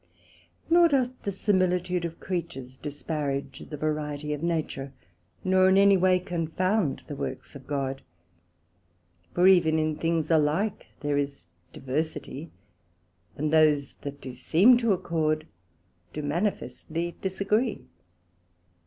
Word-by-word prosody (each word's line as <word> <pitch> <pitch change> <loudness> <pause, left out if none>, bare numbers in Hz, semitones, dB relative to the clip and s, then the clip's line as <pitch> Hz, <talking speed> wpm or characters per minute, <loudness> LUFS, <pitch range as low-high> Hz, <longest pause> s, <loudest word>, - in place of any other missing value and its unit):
Nor 340 +1 +6
doth 260 -5 +2
the 200 - -2
similitude 180 -2 +1
of 165 0 -6
Creatures 145 -8 -5
disparage 145 -1 -4
the 150 - -5
variety 150 -1 -2
of 150 - -5
Nature, 155 -5 -2 0.5
nor 185 0 +4
any 195 +1 +6
way 185 0 +4
confound 180 0 -1
the 145 - -6
Works 130 -1 -5
of 135 - -11
God. 135 -2 -2 1.3
For 180 +1 +5
even 170 -4 +5
in 155 -1 0
things 165 0 -1
alike 160 +7 +1
there 145 -1 0
is 140 -4 -4 0.3
diversity; 150 +2 -4 0.9
and 150 +2 -2
those 150 -3 +4
that 140 0 -6
do 130 -2 -8
seem 170 - +5
to 230 -3 +2
accord, 160 -4 0 0.7
do 150 - -4
manifestly 165 0 -2
disagree. 200 +5 0
160 Hz, 120 wpm, -27 LUFS, 145-185 Hz, 1.3 s, Nor